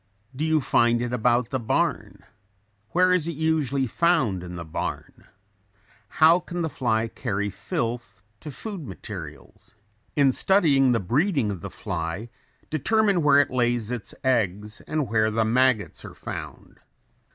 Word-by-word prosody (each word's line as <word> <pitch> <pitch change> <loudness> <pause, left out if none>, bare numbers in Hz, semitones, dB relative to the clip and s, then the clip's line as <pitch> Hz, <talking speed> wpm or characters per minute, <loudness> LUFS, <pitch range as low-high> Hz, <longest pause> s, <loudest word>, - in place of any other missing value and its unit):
Do 145 - -3
you 160 -1 +2
find 120 -2 +3
it 120 0 -3
about 120 0 +1
the 130 - -1
barn? 115 - -1 0.7
Where 180 +4 +3
is 175 -3 +1
it 170 - -2
usually 150 -4 0
found 120 - +1
in 90 0 -8
the 85 -1 -6
barn? 80 - -6 0.9
How 165 +3 +6
can 175 -1 -5
the 160 - -2
fly 115 -3 0
carry 105 -3 -3
filth 115 -2 -4 0.2
to 150 - -8
food 185 - -6
materials? 85 - -10 0.4
In 140 -2 +4
studying 140 -6 +3
the 115 - +2
breeding 135 - +1
of 95 -4 -6
the - - -6
fly 85 +7 -4 0.4
determine 200 +5 +2
where 145 -2 +5
it 145 - +3
lays 120 -2 0
its 120 -4 -5
eggs 105 -4 0
and 155 -4 -1
where 110 0 +2
the 110 +1 +1
maggots 120 -3 +1
are - - -10
found. - - -8
125 Hz, 150 wpm, -25 LUFS, 110-155 Hz, 0.9 s, How